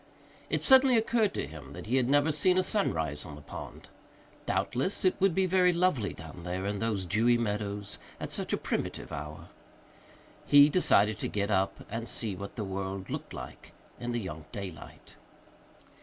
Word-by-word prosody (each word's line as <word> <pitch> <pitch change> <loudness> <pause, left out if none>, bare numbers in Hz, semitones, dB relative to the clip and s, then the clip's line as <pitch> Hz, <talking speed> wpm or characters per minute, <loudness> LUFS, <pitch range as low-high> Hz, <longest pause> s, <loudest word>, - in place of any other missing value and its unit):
It - - 0
suddenly 265 -2 +7
occurred 225 -2 +2
to - - -2
him 75 -3 -10
that - - -8
he 125 +5 +1
had 125 -1 +1
never 145 +2 +4
seen 180 +5 +3
a 185 - +4
sunrise 80 - 0
on 75 -5 -9
the 75 - -12
pond. - - -9 0.6
Doubtless 135 +11 0
it 185 - +4
would 195 -3 +3
be 190 - +3
very 180 0 +4
lovely 170 - +1
down 80 0 -10
there 90 +2 -4
in 100 0 -2
those 110 -4 -1
dewy 115 +7 +3
meadows 105 -2 -3 0.2
at - - -5
such - - -3
a - - +1
primitive - - -3
hour; 75 +1 -7 1.0
he 145 0 +8
decided 110 - +3
to - - -2
get 100 0 -2
up 95 0 0
and 115 +2 -5
see 110 -5 -2
what 100 +2 -8
the 110 - -3
world 95 0 -4
looked - - -5
like - - -9 0.3
in 120 0 -3
the 120 - -1
young 80 -7 -7
daylight. 95 -6 -9
105 Hz, 180 wpm, -30 LUFS, 95-160 Hz, 1.0 s, he